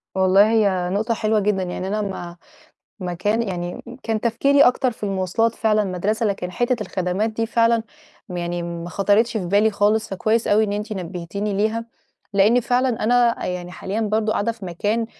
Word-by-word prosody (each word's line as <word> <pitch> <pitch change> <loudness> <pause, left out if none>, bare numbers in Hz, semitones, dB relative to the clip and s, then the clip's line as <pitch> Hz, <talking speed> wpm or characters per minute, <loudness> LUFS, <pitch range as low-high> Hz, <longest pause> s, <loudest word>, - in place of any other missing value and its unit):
والله 190 +3 +5
هي 195 -5 +2
نقطة 215 +5 0
حلوة 215 -1 +1
جدًا، 200 -2 0
يعني 185 +1 -4
أنا 210 +2 -1
ما 175 -4 -6 0.6
ما 180 -1 -3
كان 210 +6 0
يعني 175 -4 -4 0.2
كان 220 -2 -1
تفكيري 275 +5 +3
أكتر 250 0 +4
في 225 - -13
المواصلات 195 +3 0
فعلًا 215 -1 +2
المدرسة، 200 +4 -1
لكن 195 -3 -2
حِتّة 240 +6 0
الخدمات 185 +4 -1
دي 225 +1 -2
فعلًا، 230 0 +2 0.5
م 180 - -5
يعني 175 0 -3
ما 170 0 -5
خاطرتش 210 +4 +2
في 185 - -3
بالي 205 +4 +3
خالص، 210 +2 +1
فكويس 215 +4 0
أوي 215 +1 +4
إن 205 -1 -1
أنتِ 210 +1 -3
نبهتيني 190 +2 -4
ليها، 220 +3 0 0.5
لإني 215 +5 +4
فعلًا 250 -1 0
أنا 240 +1 +2
يعني 180 0 -4
حاليًا 200 +4 -4
برضه 215 0 0
قاعدة 215 +2 0
في 220 -4 -10
مكان، 205 +6 -1
210 Hz, 180 wpm, -22 LUFS, 185-225 Hz, 0.6 s, والله